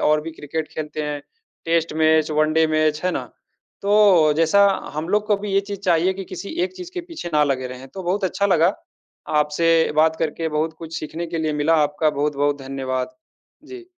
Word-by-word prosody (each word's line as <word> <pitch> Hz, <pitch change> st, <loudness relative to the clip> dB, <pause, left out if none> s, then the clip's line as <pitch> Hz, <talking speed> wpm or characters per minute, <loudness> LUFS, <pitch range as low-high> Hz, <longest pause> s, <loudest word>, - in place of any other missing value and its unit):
और 150 Hz, 0 st, +3 dB
भी 165 Hz, +2 st, -6 dB
क्रिकेट 155 Hz, +1 st, -5 dB
खेलते 155 Hz, 0 st, -4 dB
हैं। 145 Hz, -1 st, -4 dB, 0.4 s
Test 165 Hz, -1 st, +1 dB
match, 155 Hz, 0 st, +4 dB
one 155 Hz, 0 st, +2 dB
day 160 Hz, 0 st, +4 dB
match, 155 Hz, -1 st, +1 dB
है 185 Hz, -, +2 dB
ना? -, -, -3 dB, 0.6 s
तो 200 Hz, -7 st, +5 dB
जैसा 185 Hz, +5 st, +5 dB, 0.3 s
हम 155 Hz, +3 st, -3 dB
लोग 210 Hz, +1 st, +1 dB
को 210 Hz, -, +3 dB
भी 205 Hz, -1 st, -5 dB
ये 195 Hz, -, +4 dB
चीज़ 200 Hz, -1 st, -7 dB
चाहिए 180 Hz, -1 st, +2 dB
कि 195 Hz, 0 st, -6 dB
किसी 200 Hz, -, -7 dB
एक 375 Hz, 0 st, -6 dB
चीज़ 360 Hz, -1 st, -8 dB
के 360 Hz, -, -2 dB
पीछे 330 Hz, -, -8 dB
ना 150 Hz, 0 st, +5 dB
लगे 130 Hz, -2 st, -1 dB
रहें। 125 Hz, +1 st, -9 dB
तो 190 Hz, +4 st, -8 dB
बहुत 190 Hz, +3 st, -1 dB
अच्छा 195 Hz, +2 st, 0 dB
लगा, 180 Hz, 0 st, +3 dB, 0.7 s
आपसे 150 Hz, +3 st, +1 dB, 0.3 s
बात 160 Hz, +1 st, +4 dB
करके 160 Hz, 0 st, -2 dB
बहुत 155 Hz, +1 st, -1 dB
कुछ 165 Hz, -1 st, -6 dB
सीखने 165 Hz, +2 st, -5 dB
के 165 Hz, 0 st, -4 dB
लिए 155 Hz, -1 st, -1 dB
मिला। 165 Hz, +2 st, +3 dB
आपका 150 Hz, +1 st, 0 dB
बहुत-बहुत 145 Hz, 0 st, 0 dB
धन्यवाद। 130 Hz, -, -3 dB, 0.5 s
जी। 370 Hz, -2 st, -10 dB
160 Hz, 200 wpm, -22 LUFS, 150-190 Hz, 0.7 s, तो